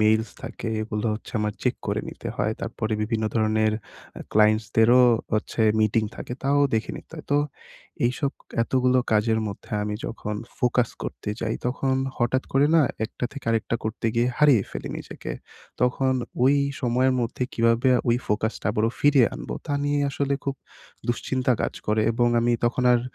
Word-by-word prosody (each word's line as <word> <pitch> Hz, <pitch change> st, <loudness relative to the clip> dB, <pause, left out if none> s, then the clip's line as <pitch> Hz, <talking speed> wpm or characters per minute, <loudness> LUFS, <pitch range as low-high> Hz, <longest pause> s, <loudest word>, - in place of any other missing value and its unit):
Mails 110 Hz, 0 st, +3 dB
থাকে -, -, -5 dB
এগুলো 105 Hz, 0 st, -3 dB
হচ্ছে 110 Hz, -, -9 dB
আমার 105 Hz, 0 st, 0 dB
চেক -, -, +1 dB
করে -, -, 0 dB
নিতে -, -, -7 dB
হয়। -, -, 0 dB
তারপরে 110 Hz, 0 st, -3 dB
বিভিন্ন 110 Hz, 0 st, -1 dB
ধরণের 110 Hz, -1 st, +2 dB, 0.5 s
আ -, -, -10 dB
ক্লায়েন্টসদেরও 110 Hz, +3 st, +5 dB, 0.3 s
হচ্ছে 110 Hz, +1 st, -1 dB, 0.2 s
মিটিং 110 Hz, +1 st, +3 dB
থাকে, -, -, -6 dB
তাও 140 Hz, +1 st, +2 dB, 0.2 s
দেখে 110 Hz, -, 0 dB
নিতে -, -, -13 dB
হয়। 155 Hz, -, -8 dB
তো 145 Hz, -, +5 dB, 0.7 s
এইসব 135 Hz, +3 st, -1 dB, 0.3 s
এতগুলো 130 Hz, +1 st, +2 dB
কাজের 110 Hz, +1 st, +3 dB
মধ্যে 100 Hz, -, -9 dB
আমি 105 Hz, 0 st, -2 dB
যখন 105 Hz, -2 st, -4 dB, 0.2 s
ফোকাস 125 Hz, -2 st, +2 dB
করতে -, -, -6 dB
যাই 110 Hz, -, -1 dB
তখন 130 Hz, +1 st, 0 dB, 0.2 s
হঠাৎ 125 Hz, +2 st, +1 dB
করে 135 Hz, +2 st, +4 dB
না, 160 Hz, -, +6 dB, 0.2 s
একটা 125 Hz, -, -5 dB
থেকে 140 Hz, -, -9 dB
আরেকটা 115 Hz, +1 st, 0 dB
করতে 110 Hz, +1 st, -2 dB
গিয়ে 120 Hz, +1 st, +2 dB
হারিয়ে 140 Hz, -9 st, +6 dB
ফেলি -, -, -6 dB
নিজেকে। -, -, -7 dB, 0.5 s
তখন 130 Hz, +1 st, +2 dB, 0.3 s
ওই 135 Hz, +2 st, +5 dB, 0.3 s
সময়ের 130 Hz, +1 st, +2 dB
মধ্যে 115 Hz, +2 st, -2 dB
কীভাবে 115 Hz, +2 st, +3 dB, 0.2 s
ওই 120 Hz, -, +4 dB
ফোকাসটা 110 Hz, +2 st, -1 dB
আবারও 110 Hz, +2 st, +1 dB
ফিরিয়ে 145 Hz, -5 st, +5 dB
আনবো -, -, -5 dB
তা -, -, -2 dB
নিয়েই 145 Hz, 0 st, +1 dB
আসলে 140 Hz, 0 st, 0 dB
খুব 140 Hz, -1 st, -1 dB, 0.5 s
দুশ্চিন্তা 130 Hz, +2 st, 0 dB
কাজ -, -, -2 dB
করে 105 Hz, +1 st, +2 dB
এবং 120 Hz, +1 st, +2 dB
আমি 120 Hz, +1 st, +2 dB
তখন 120 Hz, +2 st, +1 dB
আর 120 Hz, -, +4 dB
120 Hz, 165 wpm, -25 LUFS, 110-130 Hz, 0.7 s, না